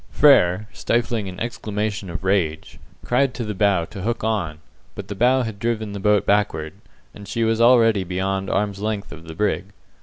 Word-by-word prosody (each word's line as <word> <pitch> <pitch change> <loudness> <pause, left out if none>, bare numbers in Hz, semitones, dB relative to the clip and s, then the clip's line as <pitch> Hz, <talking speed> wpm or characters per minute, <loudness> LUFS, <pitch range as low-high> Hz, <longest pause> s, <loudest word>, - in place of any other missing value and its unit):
Frere, 105 -9 +4
stifling 115 -4 -1
an 90 - -9
exclamation 105 -3 -3
of 85 +2 -6
rage, 90 -5 -1 0.3
cried 125 +1 +1
to 120 - -3
the 105 - -3
bow 100 -4 +2
to 95 +2 -9
hook 115 +3 -2
on, 100 -9 -1 0.4
but 100 -1 -8
the - - -3
bow 125 +5 +3
had 110 -3 -6
driven 110 -2 -2
the 100 - -5
boat 105 0 +2
backward, 100 -7 0 0.4
and 100 -1 -11
she 115 - -1
was 115 0 +1
already 115 -4 +5
beyond 95 +2 -2
arm's 100 0 -1
length 105 -1 -3
of 80 - -11
the 80 - -8
brig. 105 +1 0
105 Hz, 185 wpm, -22 LUFS, 95-115 Hz, 0.4 s, already